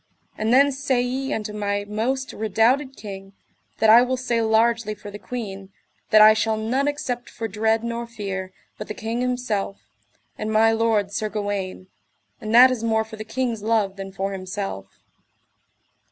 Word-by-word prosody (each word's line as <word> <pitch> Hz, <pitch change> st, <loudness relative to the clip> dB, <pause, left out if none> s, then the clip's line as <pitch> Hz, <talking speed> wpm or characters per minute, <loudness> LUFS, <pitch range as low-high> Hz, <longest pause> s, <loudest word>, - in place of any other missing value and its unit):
And 220 Hz, +1 st, -1 dB
then 280 Hz, +3 st, +5 dB
say 265 Hz, -2 st, 0 dB
ye 260 Hz, +3 st, -2 dB
unto 215 Hz, -3 st, -3 dB
my 205 Hz, -1 st, -2 dB
most 250 Hz, +6 st, -2 dB
redoubted 235 Hz, +6 st, +1 dB
king, 195 Hz, -2 st, -9 dB, 0.4 s
that 220 Hz, 0 st, +5 dB
I 235 Hz, +2 st, +9 dB
will 255 Hz, +1 st, 0 dB
say 240 Hz, -2 st, 0 dB
largely 225 Hz, 0 st, +2 dB
for 205 Hz, 0 st, -10 dB
the 205 Hz, -, -9 dB
queen, 195 Hz, -6 st, -7 dB, 0.4 s
that 215 Hz, 0 st, +7 dB
I 215 Hz, 0 st, +9 dB
shall 220 Hz, 0 st, 0 dB
none 250 Hz, +6 st, 0 dB
except 260 Hz, -5 st, -3 dB
for 225 Hz, -, -5 dB
dread 220 Hz, +2 st, 0 dB
nor 235 Hz, 0 st, -4 dB
fear, 195 Hz, -5 st, -5 dB, 0.3 s
but 210 Hz, -, -6 dB
the 210 Hz, -, -6 dB
king 225 Hz, +2 st, -3 dB
himself, 245 Hz, -6 st, -2 dB, 0.6 s
and 215 Hz, 0 st, -2 dB
my 220 Hz, +1 st, +4 dB
lord 225 Hz, -3 st, +1 dB
Sir 215 Hz, +1 st, -2 dB
Gawaine; 205 Hz, -3 st, -4 dB, 0.6 s
and 215 Hz, -1 st, -4 dB
that 255 Hz, +2 st, +9 dB
is 240 Hz, -3 st, -3 dB
more 220 Hz, -1 st, +2 dB
for 220 Hz, 0 st, -11 dB
the 215 Hz, -, -5 dB
king's 230 Hz, 0 st, -2 dB
love 210 Hz, -3 st, +1 dB
than 195 Hz, -1 st, -7 dB
for 195 Hz, +1 st, -3 dB
himself. 190 Hz, -, -5 dB
220 Hz, 170 wpm, -23 LUFS, 205-240 Hz, 0.6 s, I